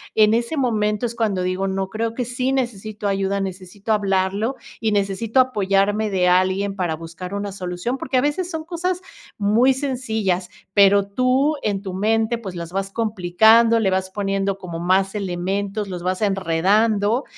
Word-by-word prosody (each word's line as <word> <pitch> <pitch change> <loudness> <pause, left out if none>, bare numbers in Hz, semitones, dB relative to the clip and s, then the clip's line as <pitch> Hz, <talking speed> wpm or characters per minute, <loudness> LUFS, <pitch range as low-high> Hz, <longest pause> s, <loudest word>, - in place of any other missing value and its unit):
En 215 0 +5
ese 235 +7 0
momento 215 -3 0
es 235 0 -4
cuando 210 -5 0
digo: 185 +1 -1
"No, 190 0 -2
creo 225 +3 -2
que 245 +1 -3
sí 250 +2 -1
necesito 215 -5 -3
ayuda, 195 0 0
necesito 195 +3 -4
hablarlo 200 +4 0 0.2
y 220 -1 0
necesito 205 +4 0
apoyarme 205 -3 +2
de 185 -2 +1
alguien 190 +2 +2
para 175 -5 -1
buscar 165 +4 -8
una 200 0 -3
solución". 185 +6 -4
Porque 260 0 -1
a 250 - +4
veces 315 +5 -1
son 320 -2 -4
cosas 360 +2 -2 0.4
muy 225 +6 +3
sencillas. 220 -9 -2 0.2
Pero 200 0 +5
tú, 255 +7 +2
en 200 -2 -1
tu 190 -2 -6
mente, 220 +4 +1
pues 195 -5 -7
las 170 0 -6
vas 195 +1 -3
complicando, 220 +2 +4
le 205 -4 +2
vas 190 0 -1
poniendo 195 0 -1
como 170 -3 -7
más 190 +3 +1
elementos, 200 +2 -2
los 180 -2 -6
vas 185 +3 -1
enredando, 205 - +2
200 Hz, 165 wpm, -21 LUFS, 190-230 Hz, 0.4 s, En